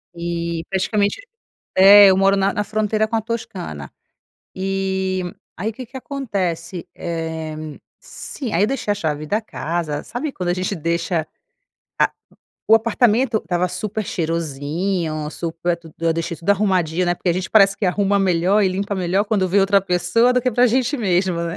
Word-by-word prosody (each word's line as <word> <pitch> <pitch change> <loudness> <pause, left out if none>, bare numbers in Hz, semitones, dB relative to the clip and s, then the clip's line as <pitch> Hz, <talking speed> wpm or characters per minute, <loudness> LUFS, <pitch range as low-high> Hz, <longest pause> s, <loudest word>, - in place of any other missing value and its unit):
E, 170 -1 -3
praticamente 200 - 0 0.6
É. 200 +2 +9
Eu 190 - +4
moro 195 +1 +4
na 195 0 +2
na 210 - -1
fronteira 215 0 0
com 225 - -1
a - - +1
Toscana. 185 - -6 0.6
E 190 0 -1 0.3
aí 215 +5 -3
que 255 +3 -9
que 255 +4 -11
acontece? 185 - -3
Eh, 160 -2 -4 0.4
se 260 -6 -7
aí 185 +5 +3
deixei 240 -4 -1
a - - -1
chave 155 -6 -3
da 210 +8 0
casa, 165 -7 -3
sabe 270 +6 -4
quando 180 -9 -3
a - - +1
gente 185 +2 -2
deixa 170 0 -1
a - - -15 1.4
o - - +9
apartamento 230 +1 +2
estava 180 -3 -1
super 210 +4 -4
cheirosinho, 160 0 -2
super 170 +2 -2
tudo 165 -2 -16
Eu 165 0 +1
deixei 165 +1 -3
tudo 175 +5 -1
arrumadinho, 185 -4 +1
né. 175 - +2
Porque 175 - -1
a - - +3
gente 185 +2 -3
parece 195 -2 +5
que 200 - -2
arruma 200 +2 +2
melhor 190 +2 +2
e 195 - +3
limpa 200 +2 -2
melhor 190 +2 0
quando 200 -4 0
vem 200 - +3
outra 195 +1 +4
pessoa 195 +7 +2
do 250 - +2
que 255 - +1
pra 245 +2 +4
gente 255 +3 +1
mesmo, 185 -4 +1
né? 165 0 -4
190 Hz, 175 wpm, -20 LUFS, 170-210 Hz, 1.4 s, É